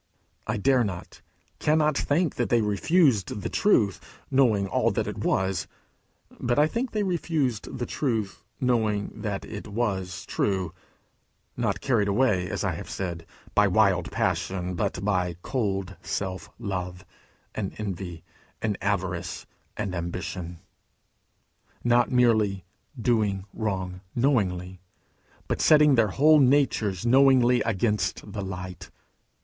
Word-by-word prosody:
I - - -1
dare 125 +4 +3
not, 90 -5 -6 0.4
cannot 155 -1 +2
think 155 +3 +1
that 120 - -1
they 120 -1 +3
refused 105 - +2
the - - -2
truth, 110 - +2 0.3
knowing 115 -7 +3
all - - +2
that - - -1
it - - -5
was; 95 -4 0 0.7
but 120 0 0
I 150 - +6
think 235 +10 -2
they 215 -2 -1
refused 155 - -1
the 120 - -2
truth, 110 -10 -2 0.2
knowing 110 -5 +1
that 100 -3 -4
it 105 -1 -7
was 95 -5 -2
true 95 -5 -1 0.8
not - - -1
carried 115 -6 +2
away, 100 -4 +2
as - - -3
I - - +1
have - - -7
said, 85 -3 -4 0.3
by 105 0 +5
wild 95 -3 +2
passion, 90 -1 -1
but 90 +2 -2
by 90 -4 0
cold 100 -6 -2
self 95 +1 -4
love, 90 -4 -4 0.5
and 100 -3 -4
envy, 95 -5 -5 0.4
and 105 -2 -2
avarice, 95 -4 -2 0.3
and 100 -4 -3
ambition; 85 0 -4 1.3
not 120 0 +3
merely 110 -7 +2 0.3
doing 105 -5 +1
wrong 95 -4 -3
knowingly, 95 -8 0 0.7
but - - -1
setting 150 -2 +6
their 115 -4 +4
whole 150 +9 +5
natures 125 -8 +2
knowingly 125 -1 +5
against 105 -1 -1
the 105 - -3
light. 90 -1 -7
105 Hz, 125 wpm, -26 LUFS, 95-125 Hz, 1.3 s, I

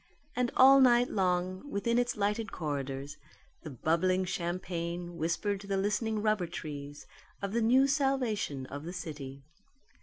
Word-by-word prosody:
And 250 -1 +1
all 270 +1 +8
night 245 -1 +5
long, 185 +4 -1
within 235 +1 +1
its 245 -1 -1
lighted 210 +2 -1
corridors, 140 -2 -4 0.4
the 160 - -8
bubbling 170 +7 +1
champagne 175 -1 -3
whispered 170 +5 -1
to 200 - -11
the 195 -1 0
listening 210 +2 0
rubber 215 -5 +1
trees 145 -3 -7 0.3
of 200 -1 -4
the 235 - +1
new 255 +4 +5
salvation 260 - 0
of 140 +2 -7
the 175 +2 -6
city. 145 -6 -7
185 Hz, 145 wpm, -31 LUFS, 160-220 Hz, 0.4 s, all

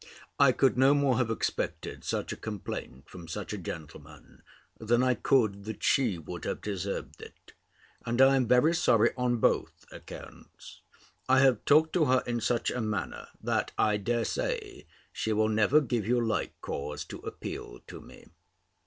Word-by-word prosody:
I - - +7
could 130 -2 +2
no 135 +2 +6
more 135 -4 +2
have 120 -3 +1
expected 115 - -3
such - - -2
a - - -6
complaint 95 - -7
from 85 -2 -11
such 105 +5 -5
a - - -3
gentleman, 75 -3 -10 0.4
than 120 +3 +2
I 130 0 +3
could, 105 -4 +1
that 110 -1 -7
she 120 -9 +2
would 85 +2 -8
have - - -3
deserved 100 -1 -5
it: - - -14 0.5
and 120 +1 -2
I 135 +1 +7
am 130 -3 +1
very 125 +7 +4
sorry 115 -9 +3
on 125 -1 0
both - - 0
accounts. - - -12 0.5
I 130 +1 +6
have 130 -5 +3
talked 155 +2 +4
to 165 -4 +3
her 130 -1 +2
in 120 -1 -2
such 115 +1 0
a 125 - -3
manner, 105 -5 -3 0.2
that, - - -1
I 105 -1 +2
dare 115 +3 -1
say, 425 -6 -4 0.3
she 110 - -1
will 110 +1 +2
never 110 +7 +4
give 120 -7 -2
you 120 +1 +2
like 110 -3 -2
cause 75 +1 -5
to - - -9
appeal - - -7
to - - -10
me. - - -15
115 Hz, 170 wpm, -29 LUFS, 100-130 Hz, 0.5 s, I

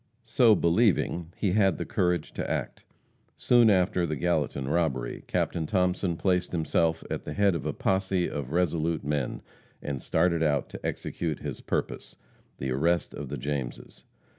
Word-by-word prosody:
So 115 -1 +5
believing, 85 -3 +2
he 100 - 0
had 95 -2 +3
the - - -3
courage 90 -3 0
to - - -4
act. - - -4 0.5
Soon 120 -2 +5
after 90 -2 +2
the 75 - -2
Gallatin 75 -6 -1
robbery, 70 -6 -1
Captain 80 -2 -1
Thomason 90 -1 0
placed 90 -1 0
himself 80 0 +1
at - - -3
the - - -5
head 100 -2 +3
of 85 -6 -3
a - - 0
posse 95 -1 0
of 70 -2 -5
resolute 85 -2 0
men, 75 -3 -2 0.4
and 70 -3 -4
started 85 -2 +1
out 75 -3 +1
to - - -9
execute 80 -4 -3
his - - -5
purpose - - -3 0.4
the 65 0 -3
arrest 85 +7 +1
of 70 -2 -6
the 75 - -4
Jameses. 70 -1 -5
85 Hz, 160 wpm, -27 LUFS, 75-90 Hz, 0.5 s, So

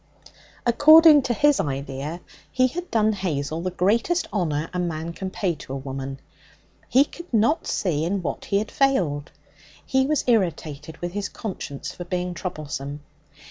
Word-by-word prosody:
According 310 +5 +8
to 245 - -1
his 295 +1 +4
idea, 140 +4 -3 0.3
he 255 0 +3
had 350 +8 -3
done 220 -1 +2
Hazel 160 -5 -2
the 185 - -1
greatest 225 - +1
honour 160 -6 0
a 180 - -2
man 165 -1 -3
can 190 +2 -5
pay 185 -1 -1
to 135 -3 -9
a - - -2
woman. 135 0 -6 0.7
He 270 +3 +5
could 345 +3 -12
not 235 +7 +2
see 160 -6 0
in 185 +2 -1
what - - -4
he 200 - +1
had 210 +2 -2
failed. 175 - +1 0.6
He 265 -1 +2
was 305 -1 +1
irritated 160 - -1
with 175 0 -3
his 205 +2 -3
conscience 180 - -6
for 175 - -7
being 180 0 -2
troublesome. 150 -4 -5
180 Hz, 160 wpm, -24 LUFS, 150-240 Hz, 0.7 s, According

